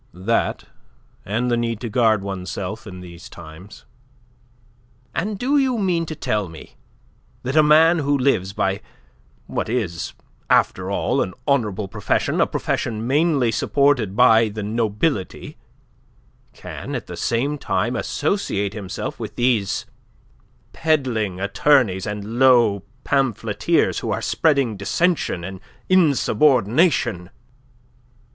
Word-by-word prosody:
"That 100 +6 -1 0.6
and 120 +5 -1
the - - +3
need 115 -2 -2
to 120 - -3
guard 110 -3 +2
one's 95 -2 -5
self 105 +2 -5
in 90 -2 -9
these 85 -2 -11
times." 85 +4 -12 1.3
"And 205 +4 -2
do 275 +7 +2
you 260 -3 +1
mean 175 -5 0
to 155 - -5
tell 105 - -2
me 80 - -13 0.7
that 130 +3 -3
a 155 - +7
man 160 +3 +5
who 145 -1 +1
lives 125 -8 +1
by 95 0 -1 0.6
what - - -3
is 100 -9 -2 0.4
after - - +2
all - - 0
an 95 - -3
honourable 110 -8 0
profession, - - -1
a - - +3
profession 110 -1 -2
mainly 140 -2 +2
supported 130 -7 +1
by 115 -2 +5
the 105 0 -6
nobility, 110 - -2 0.9
can - - -7
at - - -4
the - - -8
same 140 +5 -1
time 110 +3 -1
associate 105 - -1
himself 100 -4 -6
with - - -6
these 120 -5 0 0.9
peddling 120 - 0
attorneys 105 - +2
and 105 +3 -5
low 120 -6 +5 0.2
pamphleteers 135 -6 +1
who - - -4
are - - -1
spreading 140 -8 +1
dissension 140 - 0
and 95 +1 -7 0.3
insubordination?" 135 - +3
115 Hz, 125 wpm, -21 LUFS, 100-145 Hz, 1.3 s, a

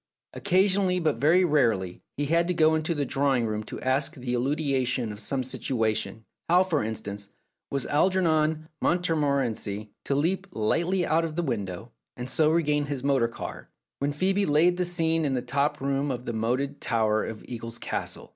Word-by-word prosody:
Occasionally, 185 0 +2
but 155 -8 +1
very 170 +7 +4
rarely, 115 - +1 0.2
he 145 - 0
had 170 +3 +2
to 180 - 0
go 160 -1 +4
into 160 +1 0
the 145 -1 -1
drawing 135 -2 +1
room 110 -1 -2
to - - -7
ask 140 +5 +1
the 125 -2 -4
elucidation 130 -3 0
of 105 - -8
some 130 +5 -2
situa 115 -3 0
tion: 105 +3 -4 0.2
how, 180 +2 +6
for 165 -8 0
instance, 105 -2 -4 0.4
was 140 -1 -1
Algernon 155 -2 +2
Montmorency 140 - 0
to 140 - 0
leap 185 +7 0
lightly 170 - 0
out 160 +2 +2
of 160 -2 -4
the 175 - 0
window, 110 - -4 0.3
and 125 0 -5
so 155 +4 +3
regain 150 -3 +2
his 140 -3 -4
motor 135 -4 +3
car, 115 - -8 0.3
when 140 +1 0
Phcebe 190 +7 0
had 200 - +1
laid 170 +4 +4
the 180 - +1
scene 165 -2 +1
in 140 -3 0
the 125 - 0
top 140 +4 0
room 140 +1 -1
of 125 -2 -4
the 120 - -3
moated 125 +6 -1
tower 110 -2 +1
of 110 - -7
Eagles 115 -1 -7
Castle - - -4
140 Hz, 185 wpm, -27 LUFS, 120-165 Hz, 0.4 s, how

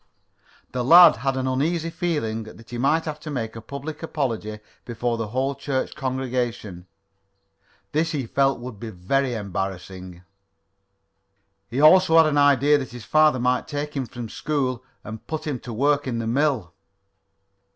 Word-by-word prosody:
The 125 -1 -2
lad 170 +5 +8
had 135 +3 -1
an 130 - -1
uneasy 160 +6 -1
feeling 145 -12 -2
that 110 +1 -14
he 120 - -5
might 155 +5 +2
have 150 -1 -5
to 155 - -8
make 115 -6 -4
a 115 - -7
public 140 +6 -7
apology 115 -9 -3 0.2
before 120 0 -2
the 115 -2 -3
whole 130 +5 -1
church 135 -1 -3
congregation. 125 -9 -3 1.0
This 160 +2 0
he 140 -5 -2
felt 135 +3 +1
would 120 -4 -8
be 115 - -6
very 120 +7 -1
embarrassing. 95 -3 -6 1.5
He 125 - -3
also 165 +2 +6
had 165 - +7
an 150 -1 +2
idea 145 +1 +4
that 130 - -6
his 120 -2 -10
father 155 -3 +4
might 125 +1 0
take 150 0 -4
him 135 -3 -2
from 120 -1 -7
school 130 -1 -2 0.2
and 110 +1 -9
put 155 -1 -4
him 145 -5 -3
to 120 - -9
work 140 +5 +1
in 120 -2 -2
the 115 - -3
mill. 120 - 0
130 Hz, 160 wpm, -23 LUFS, 115-150 Hz, 1.5 s, lad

